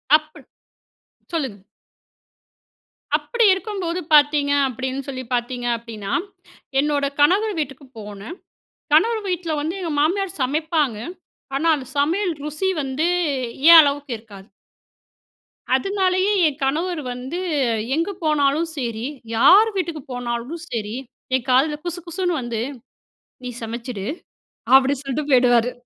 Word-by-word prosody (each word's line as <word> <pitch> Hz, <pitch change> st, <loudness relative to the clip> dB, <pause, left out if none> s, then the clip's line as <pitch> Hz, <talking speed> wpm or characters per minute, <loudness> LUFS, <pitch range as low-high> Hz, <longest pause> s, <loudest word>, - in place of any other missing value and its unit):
அப்படி 310 Hz, 0 st, -3 dB, 0.9 s
சொல்லுங்க. 260 Hz, -, -3 dB, 1.5 s
அப்படி 475 Hz, -2 st, +1 dB
இருக்கும்போது 380 Hz, -3 st, -3 dB
பார்த்தீங்க 290 Hz, -1 st, +5 dB, 0.2 s
அப்படின்னு 260 Hz, +2 st, -4 dB
சொல்லி 260 Hz, -1 st, -5 dB
பார்த்தீங்க 245 Hz, 0 st, -2 dB
அப்படின்னா, 220 Hz, -4 st, -7 dB, 0.7 s
என்னோட 290 Hz, -1 st, +1 dB
கணவர் 395 Hz, +8 st, +4 dB
வீட்டுக்கு 275 Hz, -1 st, -5 dB
போனேன். 210 Hz, -, -8 dB, 0.6 s
கணவர் 440 Hz, +8 st, +4 dB
வீட்டில 340 Hz, -3 st, -2 dB
வந்து 325 Hz, +5 st, -3 dB
எங்க 335 Hz, -3 st, -3 dB
மாமியார் 370 Hz, +3 st, 0 dB
சமைப்பாங்க. 300 Hz, -3 st, 0 dB, 0.6 s
ஆனா, 320 Hz, +4 st, 0 dB
அந்த 260 Hz, -3 st, -7 dB
சமையல் 345 Hz, +5 st, +1 dB
ருசி 305 Hz, +6 st, -1 dB
வந்து 275 Hz, +5 st, -1 dB, 0.6 s
ஏன் 335 Hz, -1 st, +12 dB
அளவுக்கு 285 Hz, -2 st, -1 dB
இருக்காது. 205 Hz, -3 st, -14 dB, 1.3 s
அதனாலேயே 380 Hz, +4 st, +1 dB
"என் 295 Hz, 0 st, -4 dB
கணவர் 320 Hz, +4 st, -1 dB
வந்து 260 Hz, +8 st, -5 dB, 0.6 s
எங்கு 335 Hz, +5 st, 0 dB
போனாலும் 305 Hz, +1 st, +2 dB
சரி, 235 Hz, -2 st, -3 dB, 0.3 s
யார் 410 Hz, -, +7 dB
வீட்டுக்கு 335 Hz, -5 st, -2 dB
போனாலும் 245 Hz, +6 st, -4 dB
சரி 220 Hz, -1 st, -3 dB, 0.4 s
என் 260 Hz, 0 st, -2 dB
காதில 290 Hz, +4 st, +3 dB
குசுகுசுன்னு 345 Hz, -1 st, -2 dB
வந்து 235 Hz, -2 st, -3 dB, 0.8 s
நீ 250 Hz, -, -4 dB
சமச்சுடு 230 Hz, -2 st, -5 dB, 0.7 s
அப்படின்னு 270 Hz, +1 st, +5 dB
சொல்லிட்டு 285 Hz, +2 st, -3 dB
போய்டுவாரு." 245 Hz, -1 st, +4 dB
290 Hz, 110 wpm, -21 LUFS, 250-340 Hz, 1.5 s, ஏன்